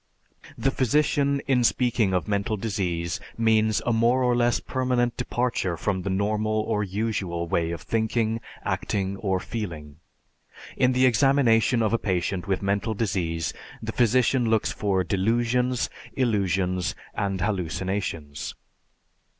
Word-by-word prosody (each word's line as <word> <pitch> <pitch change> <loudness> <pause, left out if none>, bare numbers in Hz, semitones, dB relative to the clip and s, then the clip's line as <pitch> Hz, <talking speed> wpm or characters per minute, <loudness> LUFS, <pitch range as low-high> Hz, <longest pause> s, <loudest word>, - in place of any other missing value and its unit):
The 135 - +1
physician 140 +2 +2
in 130 -3 +2
speaking 120 -4 +2
of 90 -3 0
mental 100 +1 0
disease 90 -6 -2 0.2
means 110 -1 +2
a 120 - +2
more 120 +3 +3
or 125 -1 +3
less 120 0 +2
permanent 125 -2 0
departure 120 -8 -1
from 95 +2 -1
the 95 - -3
normal 110 +2 0
or 105 -1 -1
usual 95 -4 -2
way 85 0 0
of 85 -2 -5
thinking, 115 0 0 0.2
acting, 100 -1 -1
or 95 -2 0
feeling. 85 -10 -6 0.8
In 125 0 +3
the 130 +1 +4
examination 125 -2 +4
of 110 - +1
a 115 - +2
patient 90 -1 -1
with 95 0 -1
mental 100 +3 0
disease 90 -7 -1 0.3
the - - -4
physician 125 0 +2
looks 110 -1 +2
for 95 -3 0
delusions, 120 +7 +1 0.3
illusions, 95 -7 0 0.2
and 100 -2 -2
hallucinations. 90 -5 -3
110 Hz, 130 wpm, -25 LUFS, 95-120 Hz, 0.8 s, the